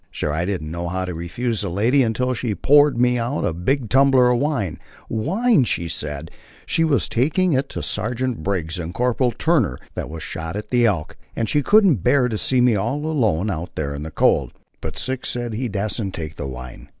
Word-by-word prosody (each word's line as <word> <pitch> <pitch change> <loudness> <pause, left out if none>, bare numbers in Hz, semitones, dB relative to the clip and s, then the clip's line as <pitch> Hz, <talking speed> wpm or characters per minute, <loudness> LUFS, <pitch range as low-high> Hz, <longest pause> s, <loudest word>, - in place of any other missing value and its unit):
"Sure 75 - -3
I 85 +3 -1
didn't 85 -6 -3
know 85 +1 -4
how 95 +1 -2
to 90 - -4
refuse 105 +8 -3
the 100 - -2
lady, 115 +10 +2
until 125 +2 0
she 115 -3 -2
poured 145 - +4
me 125 0 +3
out 120 +5 -1
a - - 0
big 120 - -1
tumbler 130 0 +5
of 120 - +2
wine 135 - -1 0.3
wine, 185 - +2
she 85 -7 -1
said, 75 -1 -5 0.3
she 165 - +1
was 145 -7 +2
taking 160 +8 +1
in 130 - +3
to - - -5
Sergeant 125 -4 -2
Briggs 85 -1 -2
and 85 +2 -5
Corporal 125 +1 +1
Turner 120 - +1 0.2
that - - -5
was 80 0 -7
shot 80 +2 -5
at 105 - -6
the 120 -2 +4
Elk, 85 -8 -2 0.2
and 115 - -1
she 150 - +2
couldn't 195 - +5
bear 125 +7 +3
to 110 - -2
see 130 -2 +2
me 120 -2 +4
all 120 +10 -1
alone 110 - +1
out 85 0 -5
there 70 -2 -2
in 70 - -6
the 80 - -5
cold." - - +2 0.3
But 80 -4 -5
Six 130 - -3
said 120 -2 -3
he 120 +3 -2
dasn't 100 -1 -3
take 80 -1 -6
the 70 - -5
wine. 65 -1 -9
115 Hz, 210 wpm, -21 LUFS, 85-130 Hz, 0.3 s, tumbler